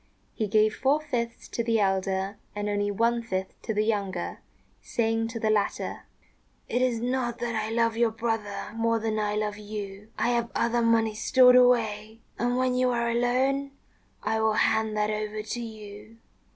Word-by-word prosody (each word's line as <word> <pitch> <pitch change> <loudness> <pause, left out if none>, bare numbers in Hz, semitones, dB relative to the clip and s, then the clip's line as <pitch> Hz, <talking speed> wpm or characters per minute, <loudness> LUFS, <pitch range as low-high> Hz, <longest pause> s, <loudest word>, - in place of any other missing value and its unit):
He 215 - -2
gave 215 +1 +3
four 280 +3 +2
fifths 240 -6 -4
to 235 - -2
the 230 -1 +1
elder 195 0 0 0.2
and 205 0 -2
only 205 0 0
one 230 +3 +1
fifth 190 -4 -4
to - - -3
the 210 0 +1
younger, 205 -4 -2 0.4
saying 225 -1 0
to 230 0 -5
the 220 -1 +1
latter, 210 -2 -1 0.6
"It 245 - 0
is 250 -3 +1
not 245 0 -1
that 240 -1 -3
I 215 0 -1
love 230 0 +1
your 235 -1 +3
brother 225 -2 -3
more 230 0 +1
than 220 -1 -1
I 210 0 0
love 210 -1 -2
you: 205 -1 -7
I - - +1
have 235 -1 0
other 235 +1 +1
money 225 -1 +3
stored 250 +3 +5
away, 225 -3 +3 0.2
and 245 +1 +1
when 255 0 +1
you 255 0 +2
are 235 -1 0
alone 265 +4 +1 0.5
I 220 +1 0
will 220 0 +3
hand 220 0 +1
that 210 0 +1
over 215 0 -3
to 220 +3 -4
you." 215 -1 -10
225 Hz, 180 wpm, -27 LUFS, 210-235 Hz, 0.6 s, stored